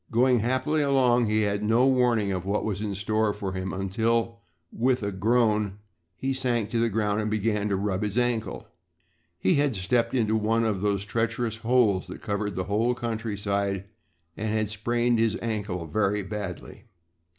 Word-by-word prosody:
Going 125 +1 +3
happily 130 +7 +1
along 130 -4 +3
he 110 0 +1
had 100 0 -1
no 115 +4 +3
warning 125 -6 +2
of 90 -2 -2
what 100 +2 -1
was 105 -2 -2
in 105 -2 -3
store 110 +1 0
for 100 -2 -4
him 95 0 -4
until, 115 +4 0 0.3
with 125 0 +1
a 100 - -1
groan, 105 -1 +1 0.4
he 135 +6 -2
sank 120 -5 -1
to 115 - 0
the 115 0 +2
ground 105 0 0
and 105 - -2
began 105 -1 0
to 100 - +1
rub 95 -1 -1
his 105 +1 -2
ankle. 120 -2 -1 0.7
He 95 - +2
had 140 -5 +1
stepped 115 +6 0
into 110 -3 +2
one 110 +1 +1
of 105 -4 0
those 100 -1 0
treacherous 115 +1 -1
holes 115 -5 +2
that - - -9
covered 105 -1 -2
the 95 - -1
whole 110 +6 +1
countryside 100 -4 -2 0.5
and 110 0 -3
had 110 -1 0
sprained 120 +2 0
his 115 0 +2
ankle 105 -6 -3
very 100 +5 0
badly. 100 +2 -7
110 Hz, 175 wpm, -26 LUFS, 100-120 Hz, 0.7 s, Going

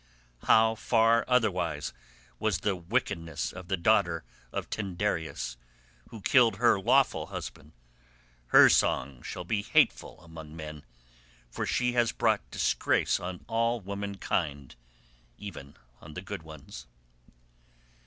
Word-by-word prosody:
How 110 0 +5
far 115 +1 +3
otherwise 100 -10 0 0.5
was 105 -4 0
the 100 -2 0
wickedness 85 -3 -2
of 95 -1 -9
the 95 - 0
daughter 85 -3 +2 0.3
of - - -4
Tyndareus 95 - -3 0.5
who 110 - -10
killed 115 -1 +4
her 120 -2 +3
lawful 130 +6 +2
husband; - - -8 0.7
her - - +8
song 65 -1 +1
shall 90 - -6
be 100 +4 -1
hateful - - +1
among 80 -2 -11
men, 75 -2 -8 0.7
for - - -3
she 125 0 +1
has 120 -2 +1
brought - - +2
disgrace - - +1
on 90 0 -7
all 115 +1 +1
womankind 95 - -3 0.6
even 80 -9 -9 0.3
on 75 0 -12
the 90 - -5
good 95 -1 -6
ones." 80 -5 -11
95 Hz, 120 wpm, -29 LUFS, 80-110 Hz, 0.7 s, her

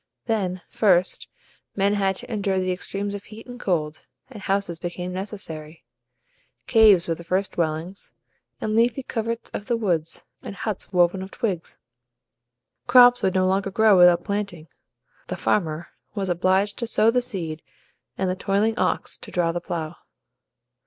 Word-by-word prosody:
Then, 190 -5 -1
first, 185 -4 +2 0.5
men 200 +1 +2
had 195 -2 +1
to 230 - -8
endure 200 -2 0
the 185 0 0
extremes 200 +2 -3
of 205 0 -7
heat 220 +1 -12
and 245 0 -10
cold, 155 -7 -2 0.2
and 215 -5 -9
houses 195 -4 -1
became 180 +1 -5
necessary. 170 -6 -7 0.8
Caves 210 -6 +5
were 165 - +1
the 170 - -9
first 185 +3 -1
dwellings, 165 +3 -3 0.5
and 215 - -2
leafy 235 +3 +2
coverts 230 -1 -4
of 205 - -6
the 235 - +1
woods, 170 -8 -2 0.2
and 200 - -8
huts 210 -1 -4
woven 180 +1 +3
of 190 - -7
twigs. 190 -6 -3 1.1
Crops 245 0 +7
would 190 0 +1
no 185 0 +3
longer 195 +1 +1
grow 215 +1 +4
without 175 -1 +6
planting. 200 -6 -4 0.6
The - - -4
farmer 165 -4 -1 0.3
was 195 -2 -2
obliged 190 +3 +1
to 235 - -2
sow 225 0 +3
the 250 +1 +2
seed 170 -10 -4 0.6
and 190 - 0
the 185 - 0
toiling 205 +4 0
ox - - -1
to - - -10
draw 170 -2 +1
the 175 +1 -3
plough. 165 -1 -5
190 Hz, 160 wpm, -24 LUFS, 175-215 Hz, 1.1 s, Crops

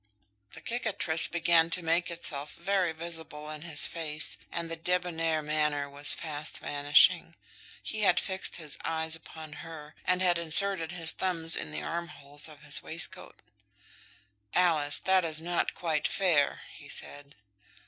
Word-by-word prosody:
The - - -11
cicatrice 215 -9 +2
began 170 -1 +3
to 170 +1 -1
make 165 +2 +1
itself 150 -4 -4
very 185 -1 0
visible 160 -2 -5
in 155 -1 -7
his 160 -3 +3
face, 155 -2 0 0.2
and 170 -1 -3
the 165 - -4
debonair 165 -2 -1
manner 150 -1 0
was 140 +1 0
fast 155 -1 -4
vanishing. 145 +1 +3 0.5
He 215 - -4
had 185 -4 +4
fixed 190 0 -1
his 155 -4 -7
eyes 160 0 -1
upon 160 -1 -11
her, 155 -2 -10
and 180 +1 +1
had 175 -2 +3
inserted 170 +1 +4
his 165 -2 +1
thumbs 165 -3 -1
in - - -4
the 75 0 -4
armholes 160 -3 -5
of 150 -3 -15
his - - +1
waistcoat. - - -5 1.1
"Alice, 160 -5 +3
that 190 -1 +3
is 160 -2 +2
not 175 +1 -1
quite 155 -3 0
fair," 165 -7 +1
he - - -13
said. 145 0 -3
165 Hz, 150 wpm, -29 LUFS, 150-175 Hz, 1.1 s, had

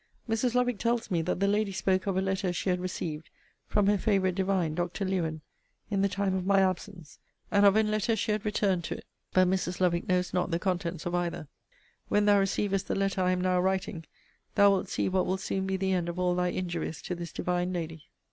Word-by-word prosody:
Mrs. 230 +2 0
Lovick 245 -3 +1
tells 235 -2 0
me 170 -2 +2
that 175 +2 -2
the 200 - +2
lady 205 0 +1
spoke 190 +1 0
of 190 -2 0
a 190 - +1
letter 190 -1 0
she 185 +1 -1
had 180 - 0
received 165 -4 -4 0.4
from 205 -1 +2
her 205 0 +3
favourite 195 -3 +2
divine 185 -4 0
Dr. 175 +4 -2
Lewen, 165 -5 -1 0.5
in 200 -1 +1
the 200 - +2
time 195 0 -1
of 190 -1 -1
my 195 +1 +4
absence; 185 -3 -2 0.3
and 200 -1 +6
of 200 - +5
an 215 -1 +3
letter 215 +2 +1
she 220 - -1
had 210 -1 -1
returned 200 -4 +1
to - - -3
it. - - -13 0.3
But 185 0 +4
Mrs. 180 -1 -1
Lovick 175 -1 +1
knows 180 -1 +1
not 180 0 0
the 170 - +1
contents 175 -2 -2
of 175 - -2
either. 175 -3 -2 0.6
When 205 0 +2
thou 205 -1 +5
receivest 195 0 0
the - - -1
letter 195 -1 0
I 180 - +2
am 185 0 +1
now 180 0 +2
writing, 185 -3 -1 0.5
thou 200 -1 +6
wilt 195 -2 0
see - - 0
what 185 0 +1
will 185 +1 0
soon 190 0 -2
be 190 0 0
the 190 0 0
end 175 -2 0
of 170 - -5
all 180 -1 +1
thy 180 0 +1
injuries 170 -4 -3
to - - -3
this 170 -2 -6
divine 180 +1 -1
lady. 165 -3 -5
185 Hz, 230 wpm, -29 LUFS, 175-200 Hz, 0.6 s, and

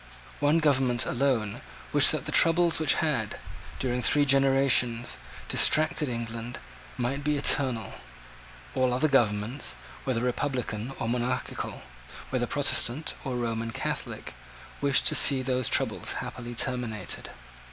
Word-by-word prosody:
One 145 +2 +3
government 135 -6 +1
alone 120 -5 -1 0.3
wished - - +7
that - - -3
the - - -4
troubles 170 0 +4
which 155 - +4
had, 120 -9 -2 0.4
during 125 -1 -2
three 145 +4 +2
generations, 135 -3 +3 0.3
distracted 155 -1 +4
England, 115 0 -5 0.4
might 130 +3 -2
be 150 0 0
eternal. 130 -5 +2 0.8
All 130 -1 +1
other 155 +5 +2
governments, 120 -1 0 0.3
whether 125 -3 -1
republican 125 -2 -3
or - - -3
monarchical, 120 +2 -3 0.5
whether - - -1
Protestant 145 +7 0
or 130 -3 -4
Roman 115 -1 -3
Catholic, - - -5 0.5
wished 140 -2 +2
to - - +4
see 135 -2 +4
those 130 -1 +1
troubles - - 0
happily 120 -1 -7
terminated. 120 -3 -3
125 Hz, 120 wpm, -27 LUFS, 120-140 Hz, 0.8 s, wished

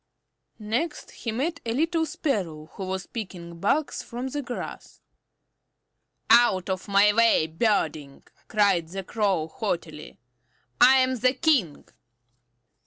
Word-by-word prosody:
Next 235 +9 -3
he 230 - -5
met 300 +9 -2
a 230 0 -2
little 325 +2 +1
Sparrow 170 - -3
who 195 - -6
was 190 0 -4
picking 175 -6 -8
bugs 275 - 0
from 245 +3 -6
the 290 +2 -3
grass. 245 -2 -7 1.3
"Out 200 -6 +4
of 185 0 -4
my 200 +1 +4
way, 230 -7 +4
Birdling!" 160 -5 -1 0.2
cried 200 -6 +2
the 195 +3 -6
Crow 195 -6 0
haughtily. 165 -4 -5 0.6
"I 260 +1 +8
am 260 0 +2
the 255 +2 +2
King." 255 - +1
210 Hz, 120 wpm, -25 LUFS, 175-255 Hz, 1.3 s, I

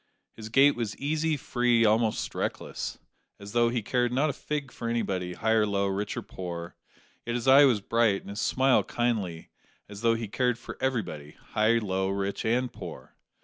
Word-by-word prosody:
His 110 -1 -8
gait 135 +5 +5
was 115 -3 -3
easy, 155 +2 0
free 120 -3 +2
almost 110 +1 +1
reckless - - -4 0.4
as 100 0 -9
though 120 +1 +3
he 120 -2 -2
cared 125 +2 +1
not 140 +4 +2
a - - -10
fig 145 -3 -4
for 115 - -5
anybody, 95 -6 -1
high 110 +5 -1
or 110 -1 +3
low, 100 -1 0
rich 100 +1 -2
or - - -3
poor; 85 -2 -7 0.5
yet 120 - -3
his 120 +1 -3
eye 140 +2 +8
was 120 -6 +3
bright 115 -2 +2
and - - -9
his 100 - -4
smile 130 0 +3
kindly, 105 -9 -2 0.4
as 100 0 -10
though 115 -1 +3
he 115 -1 -4
cared 125 +3 0
for - - -9
everybody 90 - -3
high, 110 +2 +3
low, 95 -3 -1
rich, 100 0 -2
and 125 +3 0
poor. - - -9
115 Hz, 190 wpm, -28 LUFS, 100-125 Hz, 0.5 s, eye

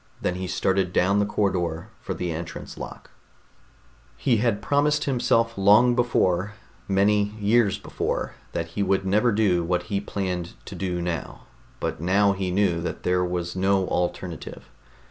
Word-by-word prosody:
Then - - -1
he 95 +1 -4
started 95 0 0
down 100 +3 +3
the 105 - +2
corridor 90 -3 -1
for - - -4
the 90 -1 -3
entrance 80 +1 -6
lock. - - -9 1.1
He 120 -4 +2
had 110 -2 +1
promised 145 +6 +2
himself 115 -3 +1
long 105 +5 +6
before... 105 -5 +1 0.3
many 100 +1 +2
years 105 0 +3
before... - - -3 0.2
that 85 0 -3
he 85 - -3
would 95 0 +1
never 105 +5 +3
do 100 -5 +2
what 90 +1 0
he 100 - +1
planned 90 -4 -3
to - - -8
do 90 -2 -2
now, 85 -4 -4 0.4
but - - -3
now 100 +3 +3
he 95 -1 -2
knew 90 -3 +1
that 85 - -5
there 90 0 +2
was 90 -1 -3
no 95 0 +2
alternative. 90 -1 -4
95 Hz, 155 wpm, -25 LUFS, 90-105 Hz, 1.1 s, long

